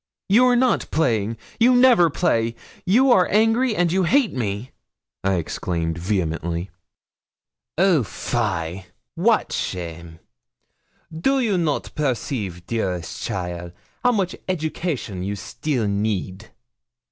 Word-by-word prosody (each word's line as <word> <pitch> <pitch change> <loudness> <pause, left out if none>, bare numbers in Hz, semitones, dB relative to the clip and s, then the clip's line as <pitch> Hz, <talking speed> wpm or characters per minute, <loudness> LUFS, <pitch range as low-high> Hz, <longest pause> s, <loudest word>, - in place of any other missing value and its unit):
'You 235 +6 +5
are 250 - +4
not 250 0 +2
playing 115 -8 0 0.2
you 245 +2 +5
never 245 -9 +6
play 115 -8 0 0.3
you 250 +8 +5
are 185 -7 +5
angry, 225 +3 +3
and 175 -3 +2
you 190 +2 +2
hate 235 +7 +2
me,' 110 -1 -3 0.5
I 95 0 +2
exclaimed, 85 -1 -2
vehemently. 85 -1 -2 1.1
'Oh, 180 -4 +4
fie! 95 -6 -3 0.3
wat 215 +6 +2
shame! 85 -2 -5 1.0
Do 270 +13 +1
you 225 -6 +1
not 165 -5 -1
perceive, 115 - -2
dearest 90 -8 -3
cheaile, 90 -2 -4 0.3
how 245 0 +4
much 190 -5 -1
education 155 - -3
you 100 +2 -3
still 115 +5 -2
need? 100 0 -2
120 Hz, 115 wpm, -22 LUFS, -, 1.1 s, never